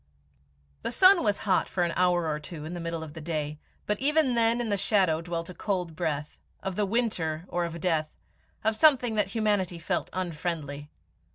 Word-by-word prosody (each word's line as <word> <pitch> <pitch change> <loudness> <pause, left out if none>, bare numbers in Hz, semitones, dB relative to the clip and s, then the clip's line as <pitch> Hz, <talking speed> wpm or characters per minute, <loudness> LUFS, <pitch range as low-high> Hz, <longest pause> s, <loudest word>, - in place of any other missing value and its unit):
The - - -2
sun 370 +4 +6
was 205 -2 +2
hot 190 -3 +2
for 180 - 0
an 170 -1 0
hour 175 -2 +2
or 150 -1 -1
two 155 0 -8
in 160 - -6
the 175 - -5
middle 165 -1 -4
of 155 -2 -9
the 160 - -8
day, 150 -2 -3 0.3
but 210 0 -1
even 295 -1 +3
then 230 0 +3
in 240 -2 -2
the 205 - +2
shadow 190 -5 +2
dwelt 170 -1 -4
a - - -9
cold 180 -3 -2
breath 150 -1 -3 0.2
of 190 -1 -3
the 205 0 0
winter, 180 -8 -1
or 175 0 -1
of 170 0 -6
death 160 -3 0 0.5
of 220 +1 +2
something 250 -3 +4
that 210 -2 +1
humanity 205 -6 0
felt 175 +2 -2
unfriendly. 155 -5 -4
175 Hz, 195 wpm, -28 LUFS, 160-215 Hz, 0.5 s, sun